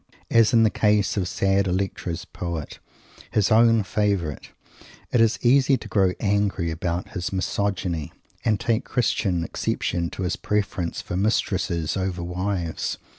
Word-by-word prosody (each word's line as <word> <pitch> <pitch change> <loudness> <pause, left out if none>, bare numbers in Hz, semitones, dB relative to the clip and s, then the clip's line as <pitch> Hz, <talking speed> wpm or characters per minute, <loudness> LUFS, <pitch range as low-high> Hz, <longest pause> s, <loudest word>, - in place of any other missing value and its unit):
As 115 -1 +5
in 115 -2 +5
the 110 - +4
case 105 -2 +2
of 95 -3 0
"sad 95 +1 +1
Electra's 90 -2 -2
poet," 85 -4 -6 0.5
his 105 +1 +1
own 115 0 +5
favorite, 100 -7 -1 0.6
it 120 - +3
is 115 0 +3
easy 135 +2 +4
to - - -10
grow 95 -3 +2
angry 100 -4 0
about 85 +1 -3
his 90 -3 -4
"Misogyny" 95 -4 -2 0.3
and 110 -3 +1
take 115 -1 0
Christian 100 -8 0
exception 85 +1 -2
to 95 - -5
his 90 - -1
preference 100 -4 -2
for - - -5
mistresses 95 -4 0
over 95 -2 -2
wives. 90 -1 -2
95 Hz, 140 wpm, -24 LUFS, 90-105 Hz, 0.6 s, As